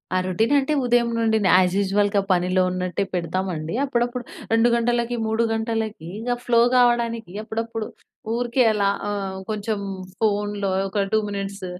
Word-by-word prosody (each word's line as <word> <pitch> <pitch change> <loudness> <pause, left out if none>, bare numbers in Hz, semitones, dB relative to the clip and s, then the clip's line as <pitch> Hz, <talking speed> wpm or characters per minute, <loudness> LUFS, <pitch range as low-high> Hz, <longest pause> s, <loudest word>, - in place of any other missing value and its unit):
ఆ - - +4
రొటీన్ 220 +9 +1
అంటే, 280 +2 +1
ఉదయం 240 -1 +3
నుండి 220 -1 +2
నే - - +4
యాస్ 180 -1 +3
యూషువల్‌‌‌‌‌‌‌‌‌గా 200 +1 +2
పనిలో 185 +1 +1
ఉన్నట్టే 185 +1 -2
పెడతామండి. 175 -2 -2
అప్పుడప్పుడు 245 -1 -1 0.3
రెండు 225 +1 +4
గంటలకి, 240 0 0
మూడు 220 +1 +1
గంటలకి, 220 -5 -3
ఇంగ 235 +3 -5 0.2
ఫ్లో 235 -1 +4 0.2
కావడానికి, 235 -4 +2
అప్పుడప్పుడు 225 0 -4 0.5
ఊరికే 245 +1 +1
అలా 200 -1 +1 0.2
ఆహ్, 195 -2 -3
కొంచెం 215 0 -2 0.4
ఫోన్‌లో 205 -2 0 0.2
ఒక 200 +1 0
2 220 - +5
మినిట్స్ 200 -1 -5
220 Hz, 140 wpm, -23 LUFS, 195-235 Hz, 0.5 s, 2